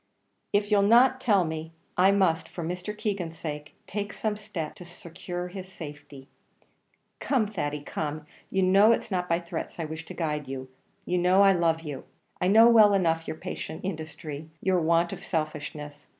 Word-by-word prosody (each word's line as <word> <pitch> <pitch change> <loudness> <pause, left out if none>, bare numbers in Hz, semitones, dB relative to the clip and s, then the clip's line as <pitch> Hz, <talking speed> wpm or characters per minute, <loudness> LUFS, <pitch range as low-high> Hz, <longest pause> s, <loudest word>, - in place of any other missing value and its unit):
"If 205 +1 +1
you'll 205 -1 +5
not 245 +5 +5
tell 205 -8 +3
me, 160 0 -5 0.2
I 185 +2 +5
must, 190 -5 +2
for 170 - -6
Mr. 180 +5 -4
Keegan's 185 -7 -3
sake, 150 -2 -6
take 205 0 -4
some 215 -1 -2
step 205 -7 -5
to - - -9
secure 175 +1 -7
his 185 0 -8
safety. 145 -5 -10 0.9
Come, 255 -6 +1
Thady, 150 -8 -3
come; 150 0 -4 0.2
you 190 0 +1
know 195 +4 +6
it's 230 - -3
not 180 -1 -1
by 170 0 +2
threats 170 -1 -6
I 165 - -1
wish 160 +1 -6
to - - -9
guide 150 -3 -2
you; 130 -1 -6 0.4
you 180 0 0
know 185 +3 +5
I 195 - +7
love 165 -3 +2
you. 145 -5 -7 0.4
I - - +2
know 220 +4 +7
well 215 -4 +7
enough 165 -3 +1
your 155 - -4
patient 160 - -6
industry 155 -3 -6
your 185 -1 +2
want 170 +1 +2
of - - -8
selfishness. 150 -2 -4
175 Hz, 180 wpm, -27 LUFS, 155-200 Hz, 0.9 s, I